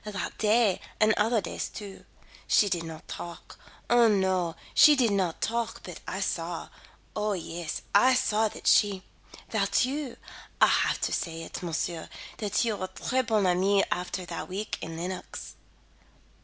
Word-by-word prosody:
"That 205 -3 -4
day 215 -2 +3 0.2
and 215 0 +5
other 220 +1 +2
days - - -4
too. 200 -2 -9 0.4
She 205 - +4
did 175 -3 0
not 160 -1 -9
talk 170 -1 -8 0.3
Oh, 240 -1 +5
no, 190 -5 +1 0.2
she 300 0 +8
did 245 -5 +3
not 185 -4 0
talk, 230 0 -2
but - - -8
I - - -3
saw - - -3 0.5
Oh, 210 0 0
yes, 170 -2 -5
I 255 +6 +6
saw 220 -3 +2
that - - -10
she 200 -3 +4 0.5
that 210 +2 +2
you 275 -1 -4 0.4
I'll - - +7
have - - +2
to - - 0
say 165 -1 -3
it, - - -7
monsieur, 165 -1 -3 0.3
that 210 +2 0
you 220 -3 -1
were 185 - -3
tres 255 +7 -2
bons 215 -4 +2
amis 190 +2 +3
after 180 +1 -2
that - - -6
week 205 +3 -4
in 165 0 -6
Lenox." 180 +2 -6
200 Hz, 160 wpm, -28 LUFS, 180-225 Hz, 0.5 s, she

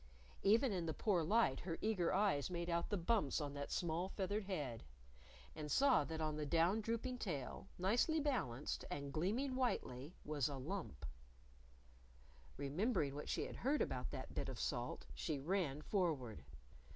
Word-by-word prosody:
Even 225 +5 +5
in 175 -4 -1
the 160 - -1
poor 195 -6 +2
light 200 - +3
her 170 -2 -3
eager 200 -6 +1
eyes 190 -8 +2
made 170 -1 -2
out 170 0 0
the 205 - +1
bumps 175 - +2
on 145 -2 -3
that 140 0 -4
small 175 +1 0
feathered 200 +1 -1
head. 145 - -3 0.7
And 150 -1 -5
saw 275 - +5
that 160 +1 -4
on 155 -1 -1
the 150 - -1
down 170 +8 +3
drooping 230 +3 -2
tail, 145 - -3
nicely 235 - +3
balanced, 195 - -1
and 140 -1 -4
gleaming 230 - 0
whitely, 155 - -1
was 150 -3 +1
a 140 - -4
lump. 160 - -4 1.5
Remembering 145 - +1
what 145 +1 -5
she - - 0
had - - -7
heard 285 +4 +2
about - - -3
that - - -6
bit - - -2
of - - -5
salt, - - -2
she 155 -3 -2
ran 150 -1 0
forward. 150 - 0
170 Hz, 165 wpm, -40 LUFS, 145-210 Hz, 1.5 s, Even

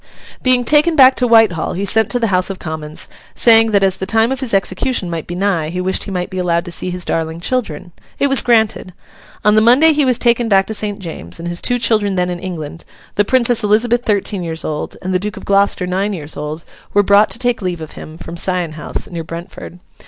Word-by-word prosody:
Being 255 -1 +2
taken 305 +4 +3
back 265 -3 +7
to 250 - +2
Whitehall, 225 -8 +3
he 195 +3 -3
sent 220 +3 +2
to 245 - +1
the 230 -2 0
House 180 +1 +2
of 195 - -5
Commons, 155 -2 -7 0.3
saying 225 -1 +5
that 200 -2 +2
as 190 -1 +1
the 190 - -5
time 225 +3 +2
of 265 - -2
his 260 -4 -4
execution 195 0 0
might 165 -2 -5
be 175 - -5
nigh, 180 -5 -1
he 180 +2 -4
wished 185 +1 -1
he - - -7
might 180 -1 -4
be 185 - -4
allowed 170 -1 0
to 175 - -7
see 180 - -3
his 180 0 -3
darling 160 0 -2
children. 195 -3 -3 0.3
It - - +1
was 270 -2 +4
granted. 220 -6 +1 0.5
On 210 - +5
the 215 - +5
Monday 265 +8 +5
he 295 0 +1
was 255 -3 +2
taken 235 -1 +1
back 195 -1 +4
to 220 - -5
St. 210 -1 -4
James's; 160 - -8
and 170 - -6
his 175 0 -3
two 245 - +1
children 215 -4 +1
then 180 -1 0
in 175 - -5
England, 165 -3 -7 0.3
the 205 - +2
Princess 240 0 +2
Elizabeth 230 +3 +2
thirteen 205 -2 -1
years 165 -1 -5
old, 150 -1 -5
and 185 +1 -2
the 185 - +1
Duke 210 +2 -5
Of - - -10
Gloucester 200 -2 +2
nine 190 +3 -1
years 155 -4 -6
old, 150 +2 -6 0.3
were 205 - +5
brought 205 +2 +4
to - - -5
take 245 -2 0
leave 180 -3 -3
of 160 -1 -8
him, 155 +1 -11
from 170 - -9
Sion 180 -1 -1
House, 155 0 -5
near 170 -4 -6
Brentford. 170 +2 -9
195 Hz, 240 wpm, -16 LUFS, 175-225 Hz, 0.5 s, back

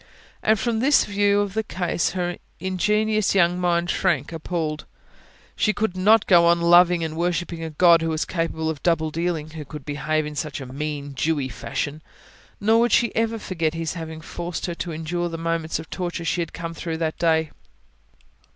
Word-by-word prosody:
And 220 -1 +3
from 230 0 0
this 275 +4 +4
view 205 0 +2
of 200 -2 -3
the 220 - +1
case 175 -5 -1
her 175 -1 -2 0.2
ingenuous 210 +4 +1
young 175 -1 +3
mind 175 0 +1
shrank 165 -7 0
appalled. 160 -2 -3 0.7
She 215 - +2
could 210 -3 -1
not 210 +4 +4
go 170 -3 +6
on 170 0 +4
loving 175 0 +5
and 160 -1 -3
worshipping 175 0 -2
a 160 - -4
God 170 +2 +5
who 165 - -1
was 160 0 -1
capable 165 -2 -2
of 160 -2 -3
double 160 -2 +1
dealing; 165 -1 -2
who 155 -1 -7
could 150 0 -10
behave 150 +1 -1
in 150 0 -6
such 145 0 -3
a 135 - -7
"mean, 145 +1 -5
Jewy 140 -1 -1
fashion". 145 +7 -4 0.6
Nor 220 +2 +4
would 235 0 +3
she 235 +2 +3
ever 225 0 +1
forget 165 -6 -2
His 165 -1 -3
having 160 -2 -7
forced 175 +2 -5
her 175 - -3
to 170 0 -5
endure 170 +2 -2
the 165 - -5
moments 165 -1 -1
of 160 +1 -8
torture 175 -2 -4
she 175 - 0
had 165 - -4
come 165 0 -6
through 165 -1 -4
that 160 -1 -2
day. 160 -2 +2
170 Hz, 190 wpm, -23 LUFS, 160-185 Hz, 0.7 s, go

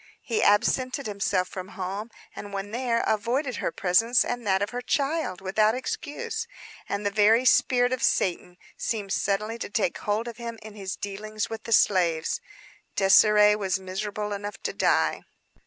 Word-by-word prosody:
He 230 -4 -1
absented 255 +6 +2
himself 200 -3 0
from 185 0 -7
home; 195 +4 -4 0.3
and 205 - -8
when 195 +1 -4
there, 235 0 0
avoided 245 +5 0
her - - -2
presence 225 +7 +3
and 245 -2 -4
that 190 0 +2
of 205 - -3
her 245 0 -4
child, 275 - -1
without 215 +4 +2
excuse. 445 - -4 0.4
And 200 +1 -3
the 205 - +1
very 220 +4 +4
spirit 250 0 +4
of 255 - -3
Satan 180 -1 0 0.2
seemed 205 -4 -3
suddenly 210 +3 -1
to - - -5
take 205 -4 -1
hold 215 +3 -1
of 235 -1 -7
him 235 -1 -6
in 220 -1 -10
his 195 -3 -5
dealings 215 +2 -5
with 225 -1 -6
the 230 - -6
slaves. 175 -7 +2 0.6
Désirée 210 +1 +6
was 190 -3 -1
miserable 205 +2 -4
enough 205 +1 -5
to - - -2
die. - - +2
210 Hz, 165 wpm, -26 LUFS, 195-235 Hz, 0.6 s, Désirée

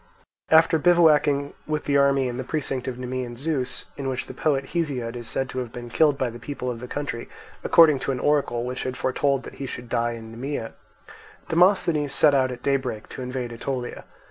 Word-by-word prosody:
After 160 0 +5
bivouacking 150 -4 +4
with 155 -1 -2
the 140 - +1
army 140 -1 +4
in 120 -1 -4
the 130 - -3
precinct 135 -2 -3
of 125 -2 -3
Nemean 125 -1 -4
Zeus, 135 -1 -2
in 135 -1 -3
which 130 -1 -3
the - - -9
poet 140 -3 0
Hesiod 135 -9 -2
is 120 -1 -3
said 135 - -1
to 130 - -3
have 125 -2 -5
been 120 0 -8
killed 150 -3 +3
by 130 -3 -1
the 120 - -10
people 125 -3 -4
of 115 - -6
the 125 - -7
country, 135 -4 -4 0.3
according 155 -5 +6
to 135 - -2
an 130 - -2
oracle 140 -5 +1
which 125 +1 -4
had 130 -1 -3
foretold 135 +1 0
that - - -9
he 135 - -3
should 120 -1 -7
die 120 0 0
in 110 -1 -9
Nemea, 120 0 -4 0.8
Demosthenes 165 -5 +3
set 145 +1 +5
out 130 -2 +3
at 125 0 -8
daybreak 130 -6 -1
to - - -7
invade 125 -1 -4
Aetolia. 125 +1 -4
130 Hz, 205 wpm, -24 LUFS, 125-145 Hz, 0.8 s, according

